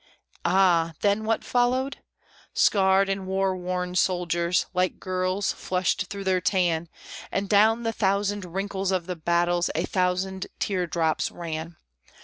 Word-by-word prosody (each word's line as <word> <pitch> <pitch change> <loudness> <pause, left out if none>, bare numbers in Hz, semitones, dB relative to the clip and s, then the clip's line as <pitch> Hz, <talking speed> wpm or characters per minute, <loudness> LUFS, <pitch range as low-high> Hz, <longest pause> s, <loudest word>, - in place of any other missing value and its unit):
Ah! 175 -4 +3
then 205 +1 +1
what 225 0 0
followed? 255 +3 +1 0.6
Scarred 195 -1 +4
and 195 -1 -2
war 190 0 0
worn 180 0 -3
soldiers, 175 -1 +1
like 185 0 0
girls, 185 +1 -1
flushed 185 +1 -1
through 200 +1 -6
their 185 -1 +1
tan, 170 -3 +1 0.4
And 200 0 -1
down 220 +3 +4
the 225 0 -1
thousand 205 0 0
wrinkles 195 +2 -3
of 185 -3 0
the 180 0 -4
battles 175 +1 +1
a 165 - 0
thousand 185 +1 -1
tear 185 -3 -1
drops 160 -2 0
ran. 165 0 -6
185 Hz, 135 wpm, -25 LUFS, 175-195 Hz, 0.6 s, Scarred